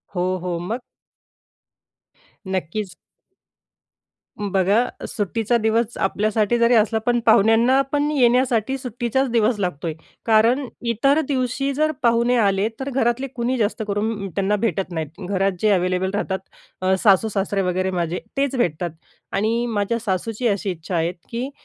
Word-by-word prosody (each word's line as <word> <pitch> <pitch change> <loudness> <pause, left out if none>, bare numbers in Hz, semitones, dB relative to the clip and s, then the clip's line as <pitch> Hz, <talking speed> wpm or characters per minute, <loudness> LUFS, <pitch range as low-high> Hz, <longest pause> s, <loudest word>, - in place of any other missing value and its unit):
हो, 185 +1 0
हो. 175 -1 -3
मग? 215 +8 -3 1.7
नक्कीच. 190 +1 -3 1.4
बघा, 200 +3 +2 0.2
सुट्टीचा 225 +3 0
दिवस 225 +1 0
आपल्यासाठी 215 +3 +1
जरी 235 +1 +4
असला, 220 0 +3
पण 240 +2 +1
पाहुण्यांना 225 +5 +5
पण 290 0 +1
येण्यासाठी 250 -2 +2
सुट्टीचाच 250 +1 -1
दिवस 230 -1 +2
लागतोय. 170 -4 -2 0.3
कारण 230 +5 +3 0.3
इतर 275 +7 +3
दिवशी 265 0 -1
जर 310 +3 +1
पाहुणे 235 +1 +3
आले, 200 -2 +2
तर 270 +1 -3
घरातले 255 0 0
कुणी 250 +1 -1
जास्त 220 0 0
करून 205 0 -2
त्यांना 195 +3 0
भेटत 195 -4 -1
नाहीत. 160 +2 -5
घरात 195 0 +1
जे 215 - +3
अवेलेबल 185 0 +1
राहतात, 195 -2 -1 0.4
अ, 185 0 +2
सासू-सासरे 200 -1 +2
वगैरे 185 0 0
माझे, 175 -1 -2 0.2
तेच 275 -1 +1
भेटतात 175 -7 0 0.4
आणि 225 +4 +1
माझ्या 225 0 -1
सासूची 225 +3 -2
अशी 200 -2 0
इच्छा 175 +1 -5
आहे, 165 +1 +1 0.2
की 240 +3 -3
215 Hz, 135 wpm, -22 LUFS, 190-240 Hz, 1.7 s, पाहुण्यांना